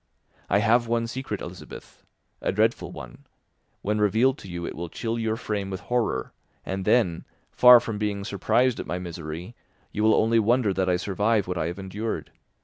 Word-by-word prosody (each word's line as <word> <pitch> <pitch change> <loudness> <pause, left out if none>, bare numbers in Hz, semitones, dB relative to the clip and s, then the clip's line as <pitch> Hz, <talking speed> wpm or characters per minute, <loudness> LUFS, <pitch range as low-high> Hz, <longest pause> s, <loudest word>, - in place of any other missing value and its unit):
I - - +4
have 115 +3 +3
one 115 0 0
secret, 130 +3 -5
Elizabeth, - - -10 0.4
a - - 0
dreadful 105 -3 +1
one; 70 -7 -11 0.6
when 105 +1 0
revealed 115 +7 +3
to - - -11
you, 85 -1 -5
it - - -5
will 85 0 -5
chill 115 +6 -3
your 110 -1 0
frame 105 -4 -3
with 95 -1 -4
horror, 120 -1 -1 0.3
and 95 0 -3
then, 95 -9 +2 0.3
far 125 -1 +8
from 115 -3 -5
being 105 -2 -2
surprised 115 +5 +1
at - - -5
my 90 - -2
misery, 85 +3 -7 0.4
you 105 - -3
will 110 0 +5
only 115 +1 +3
wonder 115 -1 +2
that 95 0 0
I 90 - +3
survive 100 +3 0
what 90 -1 -2
I 80 - 0
have 85 +2 -5
endured. 100 +3 -4
105 Hz, 185 wpm, -25 LUFS, 90-115 Hz, 0.6 s, far